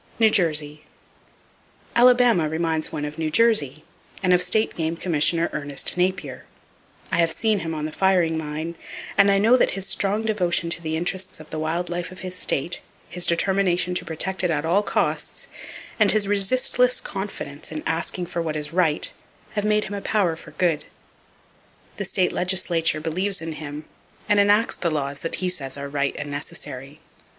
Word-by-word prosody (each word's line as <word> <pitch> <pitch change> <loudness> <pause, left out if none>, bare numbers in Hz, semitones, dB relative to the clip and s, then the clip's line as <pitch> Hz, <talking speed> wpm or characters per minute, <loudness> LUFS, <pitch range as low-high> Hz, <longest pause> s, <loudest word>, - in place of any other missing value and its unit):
[Page 220 -2 +5
253] 155 -5 +2
New 145 - -12
Jersey. - - -26 1.1
—Alabama 240 -9 +5
reminds 160 0 -1
one 150 - -3
of 150 +1 -7
New 160 -1 0
Jersey, 155 - +3 0.4
and 180 -1 +4
of 180 - +4
State 220 +4 +2
Game 165 0 -2
Commissioner 170 0 +1
Ernest 145 -2 -2
Napier. 180 -6 -1 0.7
I - - +1
have 165 -1 +3
seen 215 +1 +1
him 165 -2 -4
on 150 -1 -3
the 155 - -4
firing 175 -3 +2
line, 155 +2 -4 0.4
and 200 0 +5
I 195 - +4
know 225 +5 +5
that 240 - +2
his 195 0 -3
strong 205 +2 0
devotion 180 -6 0
to 170 - +1
the 160 -1 -2
interests 185 +1 -3
of 155 - -13
the 155 - -3
wild 165 +3 -1
life 175 0 -4
of 185 - -11
his 185 -1 -5
state, 170 -2 -1 0.3
his 175 +1 -1
determination 180 0 +1
to 180 - -2
protect 180 +3 -3
it 180 - +2
at 155 -2 0
all 180 +5 +3
costs, - - -2 0.5
and 210 -2 +5
his 215 -2 +2
resistless 250 +5 +2
confidence 190 -8 -6
in 155 -1 -5
asking 170 +2 -2
for 170 0 -3
what 160 -2 -3
is 150 +1 -4
right, 165 -4 +2 0.4
have 205 - -2
made 210 0 +3
him 205 - -6
a 200 - -4
power 190 -7 +1
for - - -13
good. 170 -4 0 1.1
The - - -3
state 185 -2 +1
legislature 175 -3 +1
believes 185 +5 +1
in 165 0 -5
him, 150 0 -7 0.4
and 205 -1 +4
enacts 205 +3 +3
the 170 - 0
laws 140 -2 -2
that 165 - -3
he 185 - -2
says 140 -7 -1
are 140 0 -5
right 140 0 -1
and 145 -1 -5
necessary. 145 0 -7
170 Hz, 185 wpm, -23 LUFS, 155-195 Hz, 1.1 s, Page